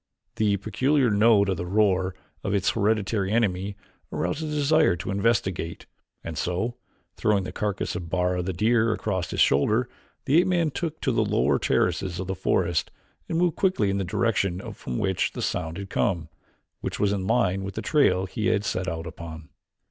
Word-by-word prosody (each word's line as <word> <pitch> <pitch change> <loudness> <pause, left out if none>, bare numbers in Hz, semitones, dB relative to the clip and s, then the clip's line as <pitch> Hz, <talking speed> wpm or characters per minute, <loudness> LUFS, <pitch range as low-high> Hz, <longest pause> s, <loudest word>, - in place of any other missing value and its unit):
The 105 -2 +2
peculiar 130 +5 +1
note 105 -1 +5
in 95 - +1
the 90 - -3
roar 95 -2 +2 0.3
of 95 - -1
his 100 -1 +2
hereditary 105 -2 0
enemy 100 -3 0 0.4
aroused 90 - -2
a 160 - -3
desire 150 - +3
to 85 - -5
investigate, 95 -5 0 0.4
and 80 -3 -5
so, 95 +7 -1 0.4
throwing 105 -3 +2
the - - -5
carcass 105 -4 -2
of 90 -2 -5
Bara, 90 0 0
the 90 +2 -2
deer, 110 +5 +2
across 95 -5 -2
his - - -4
shoulder, 110 - +3 0.4
the 150 +3 +5
ape 180 - -1
man 170 -4 +1
took 160 +1 -4
to 130 - +1
the 115 -2 +2
lower 100 -10 +2
terraces 95 -2 0
of 95 - -3
the 95 - -2
forest 85 -2 0 0.4
and 165 - 0
moved 175 -1 +1
quickly 185 - +2
in 100 - -1
the - - 0
direction 95 -1 -1
from 60 - -5
which 95 -2 0
the - - -5
sound 80 -1 -2
had 100 -1 -7
come, 85 -8 0 0.5
which - - -4
was 100 -1 +2
in 95 -2 -2
line 95 -5 +2
with 95 -1 -6
the - - -4
trail 95 - +3
he 105 +3 -2
had 105 -2 +1
set 95 -2 -2
out 80 -2 -3
upon. 80 -2 -9
100 Hz, 185 wpm, -25 LUFS, 90-115 Hz, 0.5 s, note